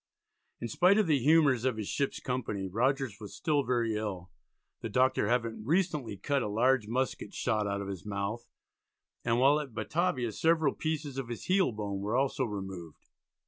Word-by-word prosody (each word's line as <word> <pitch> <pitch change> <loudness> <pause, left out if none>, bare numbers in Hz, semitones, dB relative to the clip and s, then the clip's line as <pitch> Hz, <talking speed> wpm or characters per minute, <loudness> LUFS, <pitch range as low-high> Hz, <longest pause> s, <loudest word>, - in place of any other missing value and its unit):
In 120 - -3
spite 180 - +4
of 215 - +4
the 150 -4 +3
humours 140 -3 +4
of 130 -4 0
his 105 -2 -4
ship's 140 -1 -1
company 105 -7 -3
Rogers 125 +2 0
was 105 -3 -9
still 150 -3 +1
very 120 -4 0
ill, 95 -4 -4 0.5
the 115 - -4
doctor 125 -1 +2
having 115 -2 -1
recently 150 - 0
cut 140 +6 0
a - - -1
large 115 +2 +2
musket 130 +4 -2
shot 110 -4 0
out 100 0 -2
of 100 - -5
his 95 -3 -6
mouth, 105 +3 -4 0.8
and 115 0 +1
while 140 +4 +5
at 135 -7 -7
Batavia 140 -6 0
several 160 +3 +2
pieces 150 -4 -3
of 130 - -4
his 120 -1 -6
heel 185 -5 +3
bone 105 -2 -4
were 105 +4 -2
also 135 -1 +1
removed. 95 -6 -7
120 Hz, 180 wpm, -30 LUFS, 105-140 Hz, 0.8 s, while